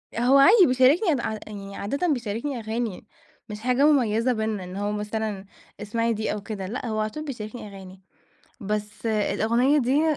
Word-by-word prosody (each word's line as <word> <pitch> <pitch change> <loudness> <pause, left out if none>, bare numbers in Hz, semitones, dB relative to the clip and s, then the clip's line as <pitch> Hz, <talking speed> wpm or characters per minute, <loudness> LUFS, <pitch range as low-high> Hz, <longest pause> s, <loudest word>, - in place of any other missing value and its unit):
هو 250 +4 +4
عادي 380 +7 +7
بيشاركني 265 - +3
ع 220 -1 -3
يعني 200 -1 -8
عادةً 280 - -2
بيشاركني 235 +3 -3
أغاني، 220 -2 -4 0.4
مش 210 0 -6
حاجة 250 +4 +2
مميزة 250 -4 +3
بيننا، 220 -3 -2
إن 180 +1 -8
هو 205 +1 -2
مثلًا، 210 -1 -3 0.3
اسمعي 230 +2 -1
دي 220 0 -2
أو 210 - -5
كده. 195 -2 -6
لأ، 245 +4 -5
هو 215 -1 -2
على 215 0 0
طول 305 +6 -7
بيشاركني 230 -4 -7
أغاني. 190 -1 -12 0.6
بس 210 +2 -4
الأغنية 235 +6 +2
دي 290 +4 +2
220 Hz, 165 wpm, -25 LUFS, 210-255 Hz, 0.6 s, عادي